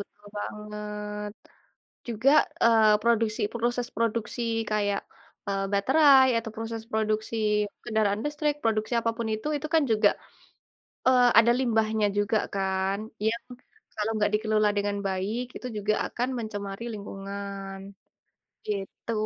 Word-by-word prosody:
betul 205 +1 -12
banget. 210 0 -5 0.8
Juga, 235 +3 +2 0.3
eee, 220 -2 +5
produksi 225 -1 +1
proses 240 +1 -1
produksi 230 +1 -1 0.3
kayak, 205 -1 +1 0.5
eee, 195 0 0
baterai, 265 +5 +6
atau 230 -1 -4
proses 225 0 -5
produksi 220 +1 -1 0.5
kendaraan 215 -1 +1
listrik 295 0 -1
produksi 220 0 0
apapun 230 0 -2
itu, 215 +7 -3
itu 290 +1 -3
kan 315 - +5
juga, 215 -1 +5 1.0
eee, 250 -1 +6
ada 230 +1 +5
limbahnya 220 -3 +1
juga 205 +2 +2 0.2
kan? 190 0 0 0.3
Yang 230 +1 0 0.5
kalau 215 +1 -1
nggak 210 0 +1
dikelola 215 0 +2
dengan 205 0 0
baik 215 +7 -3
itu - - -7
juga 210 +1 +1
akan 245 +1 -2
mencemari 205 -1 -5
lingkungan, 200 -1 -6 0.9
gitu. 205 +2 -4
215 Hz, 120 wpm, -27 LUFS, 205-230 Hz, 1.0 s, baterai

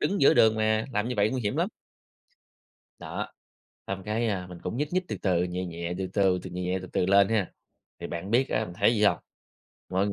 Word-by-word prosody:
đứng 200 - 0
giữa - - +6
đường 110 -1 +5
mà, 110 0 +1
làm 105 +1 0
như 125 - -2
vậy 105 +1 +3
nguy 130 +1 -2
hiểm 105 - -1
lắm. - - +1 1.3
Đó. - - -4 0.6
Xong 95 -1 -4
cái, 110 +3 -1
a, 95 -4 -2
mình 90 -1 -9
cũng - - -3
nhích 150 +4 -2
nhích 185 0 +2
từ - - -3
từ, 90 -3 +2
nhẹ 90 +1 -3
nhẹ, 85 0 -4
từ 95 -1 -2
từ 95 -3 +3
từ, - - -6
nhẹ 90 +1 -2
từ 95 - -8
từ 90 - 0
lên 100 +1 +5
ha, 105 -5 0 0.5
thì - - -5
bạn 85 +4 -5
biết, 125 +3 +3
a, 110 - 0
mình 90 - -9
thấy 115 - +5
gì 105 - +1
hông? 105 - +4 0.7
Mọi 95 +2 +1
ng 100 - -1
100 Hz, 235 wpm, -27 LUFS, 90-110 Hz, 1.3 s, giữa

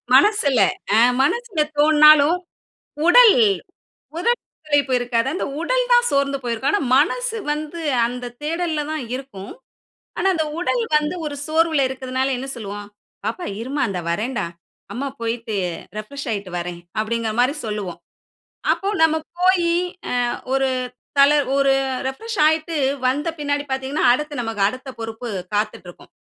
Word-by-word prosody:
மனசுல 405 - +4 0.4
ஆ - - +6 0.2
மனசுல 435 - -1 0.2
தோன்னாலும். 305 +2 +6 0.7
உடல் 470 +4 +8 0.8
உடல் 475 +8 +1 0.3
களைப்பு 285 -3 +2
இருக்காது. 240 0 0
அந்த - - -2 0.2
உடல் - - +1
தான் 485 0 +5
சோர்ந்து 275 0 +1
போயிருக்கும். 240 - -1
ஆனா, 410 - +2 0.2
மனசு 460 - +1
வந்து 305 +2 -4 0.3
அந்த 245 +1 -6 0.2
தேடல்ல 320 0 -1
தான் 310 -4 -3
இருக்கும். 240 -7 -8 0.7
ஆனா, 385 - +1
அந்த 315 -2 0
உடல் 470 +6 0
வந்து 300 +4 -2
ஒரு 295 -1 -4
சோர்வுல 315 -3 +2
இருக்குறதனால 260 0 -2
என்ன 265 - -6
சொல்வோம், 205 -2 -7 0.4
"பாப்பா 220 - -3 0.2
இருமா 275 +5 -3
இந்த 180 -2 -3
வர்றேன்டா. 215 +2 -1 0.5
அம்மா 275 +3 -3
போய்ட்டு 230 -1 -3 0.4
ரிஃப்ரெஷ் 280 +6 -6
ஆயிட்டு 200 -3 -4
வர்றேன்" 175 0 -5 0.2
அப்டிங்கிற 225 0 -2
மாரி 255 +3 +3
சொல்லுவோம். 200 -5 -4 0.7
அப்போ 390 - -2 0.2
நம்ம 320 0 +4 0.2
போயி 360 -2 +3 0.4
அ - - -1 0.4
ஒரு 270 0 +2 0.5
தல 280 +1 +7 0.2
ஒரு 275 -1 +3 0.3
ரிஃப்ரெஷ் 445 +11 -5
ஆயிட்டு 315 +1 0 0.3
வந்த 290 +5 0
பின்னாடி 285 0 -1
பார்த்திங்கன்னா, 265 +2 -1
அடுத்து 295 -1 -3
நமக்கு 225 -3 -4
அடுத்த 255 +5 -6
பொறுப்பு 225 +1 -6 0.3
காத்துட்டு 210 -3 -2
இருக்கும். - - -15
275 Hz, 135 wpm, -21 LUFS, 235-315 Hz, 0.8 s, உடல்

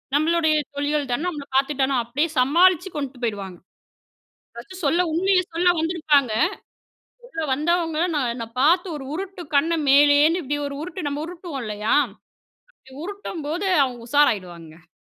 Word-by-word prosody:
நம்மளுடைய 315 0 +2 0.2
தொழிகல் 290 -1 -1
தான, 245 - 0
நம்மள 295 -5 -5
பார்த்துட்டான 270 -1 +1
அப்டியே 285 +8 -1
சமாளிச்சு 355 +7 +4
கொண்ட்டு 270 -3 -5
போயிடுவாங்க. 200 -5 -4 1.0
பர்ஸ்ட் 370 -2 -10
சொல்ல. 330 +5 +2
உண்மய 370 +3 +3
சொல்ல 355 +2 +2
வந்திருப்பாங்க. 305 -7 +1 0.9
சொல்ல 325 -10 -6
வந்தவங்ககள 330 +2 0
நான் 245 -4 -1
நா 225 - -5
பார்த்து 350 +5 +3
1 270 - -8
உருட்டு. 380 +1 -6
கண்ண 325 +4 +3 0.2
மேலேன்னு 290 +4 +5
இப்டி 290 +2 -2
1 280 - -6
உருட்டு 360 +2 -6
நம்ம 290 +1 -3
உருட்டுவோம் 335 -6 -7
இல்லையா? 210 +1 -1 0.8
அப்டி 265 - -20
உருட்டும்போது, 370 -2 -4 0.2
அவங்க 245 -2 -7
உஷாராயிடுவாங்க. 180 - 0
295 Hz, 130 wpm, -23 LUFS, 265-340 Hz, 1.0 s, மேலேன்னு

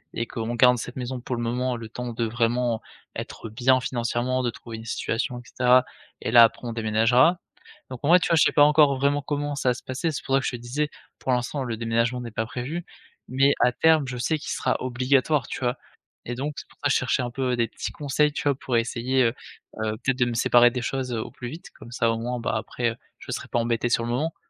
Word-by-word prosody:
et 115 - -1
qu'on 115 +1 -4
garde 125 +1 +5
cette 125 - -6
maison 125 0 -4
pour 125 +1 -3
le 120 - -3
moment, 125 +2 -1
le 115 -1 -8
temps 125 +1 -5
de 115 0 -1
vraiment 115 0 0 0.3
être 115 - -7
bien 130 +4 +3
financièrement, 125 0 -1
de 125 - 0
trouver 115 -1 -9
une 110 - -10
situation 115 +2 -2
et - - -12
caetera, 125 0 +3 0.4
et - - -2
là 120 0 +9
après 115 +2 -4
on 115 - -3
déménagera. 115 +9 +3 0.5
Donc 130 - -6
moi, 170 +5 +7
tu - - -1
vois? 165 - +4
Je 150 - +6
sais - - +3
pas 145 - +6
encore, 150 -1 +5
vraiment 140 +2 +1
comment 145 0 -2
ça 135 -2 +1
va - - +3
se - - -11
passer, 130 +6 -2
c'est 135 -5 -5
pour 135 - -2
ça - - +5
que - - -2
je - - -1
te 125 - -5
disais, 130 +6 -2 0.3
pour 130 - -2
l'instant 125 +3 -1
le 120 -3 -3
déménagement 115 +2 0
n'est 120 -1 -7
pas 110 +1 -2
prévu. 145 +9 -5 0.4
Mais 135 +3 +3
à 125 - +5
terme 160 +1 +3
je 130 -1 -5
sais 155 +6 0
qu'il - - -7
sera - - 0
obligatoire 130 +2 +1
tu - - -5
vois? 125 -1 0 0.5
Et 120 - -3
donc 145 +4 -3
c'est - - -8
pour - - -23
ça 145 - +3
je - - +3
cherchais 130 +1 0
un 120 - -3
peu 125 0 -1
des 115 -1 +1
petits - - -6
conseils, 150 +1 +1
tu - - -4
vois? 140 - +2
Pour 130 -2 -1
essayer, 120 +3 +1
heu 115 - +1 0.5
heu, 110 0 -2
peut-être 135 0 0
de 125 - +4
me 120 - -2
séparer 120 +1 +5
des 125 0 -3
choses 130 0 -2
au 110 -2 -4
plus 120 - -7
vite, 160 +6 -10
comme 120 - -14
ça 115 -1 +1
au 115 - -1
moins 120 +1 -3
bah, 115 - -2
après 115 +1 -2 0.2
je - - -8
serai - - -4
pas 120 - 0
embêté, 115 0 0
sur 115 - +2
le - - -4
moment. 150 +7 -1
125 Hz, 255 wpm, -25 LUFS, 115-135 Hz, 0.5 s, là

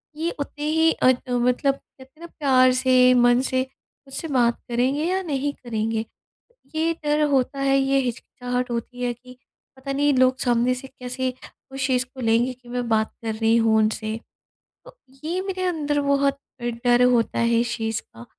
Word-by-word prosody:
ये 330 +2 -2
उतने 295 +1 -5
ही 320 +1 +3
अ, - - +1 0.2
मतलब 250 +3 +2
कहते 265 +2 -20
ना - - -7
प्यार 260 -5 +3
से, 255 0 +4
मन 245 0 +4
से 260 -1 0 0.5
मुझसे 275 +4 -5
बात 240 -4 +2
करेंगे 255 +5 0
या 375 +2 0
नहीं 285 -4 -2
करेंगे? 225 -2 -3 0.7
ये 325 +1 +1
डर 300 +1 +1
होता 275 0 0
है, 275 0 +3
ये 270 0 +2
हिचकिचाहट 250 0 -4
होती 240 +1 -5
है 245 - 0
कि 250 +1 -16 0.4
पता 265 +1 -6
नहीं 290 +1 +2
लोग 255 0 +3
सामने 245 0 +2
से 260 +1 -8
कैसे 255 -1 -4 0.4
उस 270 0 -2
चीज़ 255 -1 +1
को 260 0 -12
लेंगे 230 +2 +2
कि 250 -1 -19
मैं 245 -1 -3
बात 220 0 +1
कर 220 - -1
रही 225 +1 +2
हूँ 225 -1 +3
उनसे, 215 0 0 0.7
तो - - -15 0.3
ये 350 +4 -1
मेरे 375 -1 -3
अंदर 295 -5 0
बहुत 280 0 +1 0.2
डर 240 +1 +2
होता 230 -2 +1
है 235 0 +3
इस 235 -1 -1
चीज़ 225 -1 -2
का 115 +1 -14
255 Hz, 175 wpm, -23 LUFS, 240-280 Hz, 0.7 s, से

